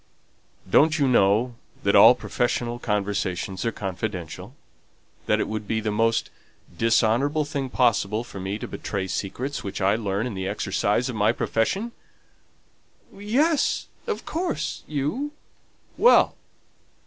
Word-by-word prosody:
"Don't 155 - +4
you 140 -3 +2
know 115 +1 +3 0.3
that - - +2
all - - +9
professional 120 0 -2
conversations 100 -3 -2
are 115 - +1
confidential? 95 -4 -5 0.7
That - - +3
it - - 0
would 110 -1 -4
be 110 - 0
the 110 -1 -2
most 115 +2 +1 0.4
dishonourable 120 - +2
thing 140 -2 -3
possible 115 -4 +1
for 110 -5 -9
me 95 +2 -3
to - - -6
betray 95 -2 -4
secrets 110 +10 -4
which 100 - -5
I 100 0 +3
learn 105 -1 -2
in 125 - -4
the 95 -1 -3
exercise 105 +3 0
of 125 - -4
my 105 +1 +3
profession?" 190 - -1 1.2
"Yes, 275 +10 +1 0.2
of - - -3
course, 320 - -3
you." 155 - -2 0.6
"Well! 485 - +5
115 Hz, 130 wpm, -24 LUFS, 100-140 Hz, 1.2 s, all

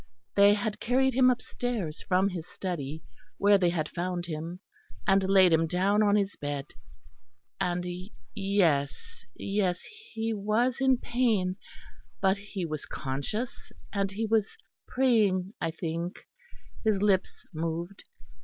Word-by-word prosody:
They 200 +1 +6
had 215 +1 -3
carried 260 +2 +2
him 255 +1 +5
upstairs 240 -8 -2
from 190 +1 +2
his 175 -4 -6
study, 160 -5 -5 0.3
where 200 0 +5
they 175 -2 +3
had 160 -3 -1
found 175 +1 -3
him; 165 +2 -5 0.5
and 195 0 +4
laid 190 -3 +6
him 165 0 +3
down 195 +5 +2
on 205 -1 +4
his 200 -1 +1
bed, 145 -1 -4 0.9
and 175 0 -1 0.5
yes, 165 -10 0
yes 195 -3 -1 0.3
he 225 0 -1
was 220 +5 +1
in 265 -1 +4
pain, 225 -8 +1 0.6
but 190 0 +3
he 200 -3 -5
was 155 -3 -5
conscious, 140 - -4 0.2
and 195 -1 0
he 215 +3 -2
was 220 -1 +1 0.3
praying 210 -7 +2
I 165 - 0
think; 170 +1 -4 0.6
his 215 -3 +2
lips 195 -2 +1
moved. 165 +4 -4
195 Hz, 130 wpm, -28 LUFS, 170-215 Hz, 0.9 s, They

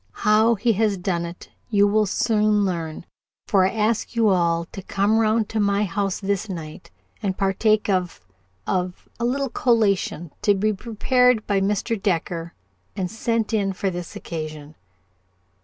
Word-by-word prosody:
How 220 +2 +5
he 230 +3 +1
has 210 -1 +1
done 175 -2 -2
it 170 +1 -11 0.2
you 205 -2 +4
will 210 +1 +2
soon 210 0 +2
learn, 165 -3 -4 0.4
for 190 -2 +3
I - - 0
ask 220 +2 -1
you 225 -2 +4
all 170 -3 +2
to 195 - -7
come 200 +3 +1
round 220 -1 +2
to 220 - -2
my 200 0 +2
house 195 0 -1
this 200 +1 -2
night 160 -4 -7 0.3
and 190 -2 -2
partake 210 +2 +2
of 185 -3 -1 0.5
of 180 -1 -2
a 235 - 0
little 270 +2 0
collation 200 - +1
to 205 - +3
be 215 +2 +1
prepared 235 +2 +2
by 200 -1 +1
Mr. 210 +2 -1
Decker 170 -3 -2 0.4
and 185 -2 -3
sent 230 0 -1
in 200 -3 +1
for 190 +1 -2
this 175 -1 -7
occasion." 155 -2 -6
200 Hz, 155 wpm, -23 LUFS, 180-220 Hz, 0.5 s, How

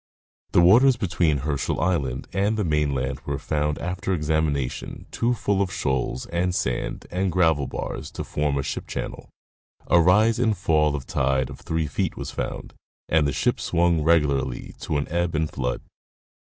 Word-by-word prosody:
The - - +6
waters 120 +9 +6
between 85 -7 +1
Herschel 75 -3 -1
island 70 -6 -1
and 100 +3 +1
the 105 - +1
mainland 70 -5 0
were 70 0 -4
found 75 +1 -1
after 90 +2 -2
examination 75 -4 -1
too 120 +1 +1
full 100 -2 0
of 95 -2 0
shoals 65 -1 -1
and 90 +1 -1
sand 65 -7 -2
and 95 +1 0
gravel 80 -6 +2
bars - - -5
to - - -4
form 75 -1 -1
a 70 - -1
ship - - -4
channel. - - -5 0.6
A 85 - +5
rise 110 +6 +4
and 110 -4 +2
fall 75 -3 +2
of 65 - -5
tide 65 0 0
of 70 - -10
three 80 -1 -2
feet 70 - -2
was - - -5
found, 60 - -5 0.4
and 80 -2 +3
the - - 0
ship 65 - 0
swung 85 -1 +2
regularly 70 -5 +1
to 75 - -2
an 70 - -2
ebb 85 0 -1
and 80 0 0
flood. 60 -2 -2
80 Hz, 170 wpm, -24 LUFS, 70-90 Hz, 0.6 s, The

